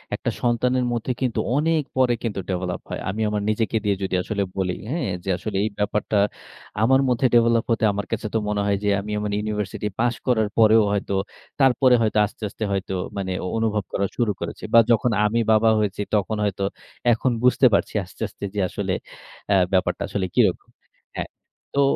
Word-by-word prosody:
একটা - - -2
সন্তানের 125 +1 +1
মধ্যে 120 +2 -2
কিন্তু 125 -3 0 0.2
অনেক 160 +1 +2 0.2
পরে 130 -2 +4
কিন্তু 105 -4 -2
ডেভেলপ 90 -1 -2
হয়। - - -4
আমি 105 +4 -3
আমার 105 -1 -1
নিজেকে 110 +1 0
দিয়ে 100 -2 +1
যদি 95 -1 -1
আসলে 100 -2 -1
বলি, 95 -2 0 0.2
হ্যাঁ? 150 - -1
যে - - -5
আসলে 105 -1 -4
এই 110 - 0
ব্যাপারটা 105 +1 0 0.7
আমার 130 +3 +5
মধ্যে 125 +1 +1
ডেভেলপ 115 -1 +4
হতে 115 -1 +1
আমার 100 0 -3
কাছে 110 -1 -2
তো 115 - +2
মনে 105 -1 0
হয় 100 -1 +1
যে, 105 - +2
আমি 105 +1 -7
আমার 105 0 -2
ইউনিভার্সিটি 105 -1 -3
পাস 120 0 +2
করার 110 -4 +2
পরেও 110 0 +6
হয়তো, 100 -1 -1 0.5
তারপরে 130 -1 +5
হয়তো 110 -1 +1
আস্তে, 105 - -11
আস্তে 110 - -6
হয়তো 95 -1 -2 0.2
মানে 95 -1 -2
অ - - -2
অনুভব 110 -2 0
করা 100 - +1
শুরু 115 -4 +2
করেছি। - - -6
বা, 115 - +9
যখন 115 +1 +3
আমি 110 +2 +1
বাবা 110 +1 +5
হয়েছি, 105 -1 -1
তখন 105 +1 0
হয়তো 100 -1 -1 0.5
এখন 125 +3 0
বুঝতে 125 +1 +4
পারছি - - +1
আস্তে, - - -17
আস্তে - - -14
যে 105 - -1
আসলে - - -2 0.8
ব্যাপারটা 95 - +1
আসলে 100 -2 -2
কিরকম। - - +2 0.5
হ্যাঁ, - - -4 0.5
তো 140 - +4
110 Hz, 185 wpm, -23 LUFS, 100-120 Hz, 0.8 s, বা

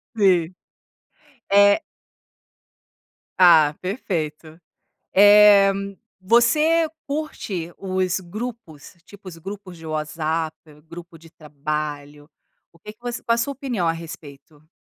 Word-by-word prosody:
Sim, 185 -5 +2 1.0
é 200 +8 +5 1.6
Ah, 160 -5 +6
perfeito. 165 - -5 0.5
Eh, 205 0 +7 0.5
você 300 - +3 0.2
curte 220 - -5
os 185 -1 -2
grupos, 195 -5 -9
tipo, 200 -1 -15
os 165 - -12
grupos 190 +1 -9
de 165 - -13
WhatsApp, 155 +1 -3 0.3
grupo 170 +1 -12
de 165 +1 -17
trabalho, 150 -1 -6 0.4
o 170 - -23
que 210 - -10
que 215 - -43
você 240 -1 -6
qual 230 - +1
a - - -5
sua 255 +4 -1
opinião 250 - -3
a - - +3
respeito? 155 -2 -12
180 Hz, 110 wpm, -22 LUFS, 155-210 Hz, 1.6 s, Eh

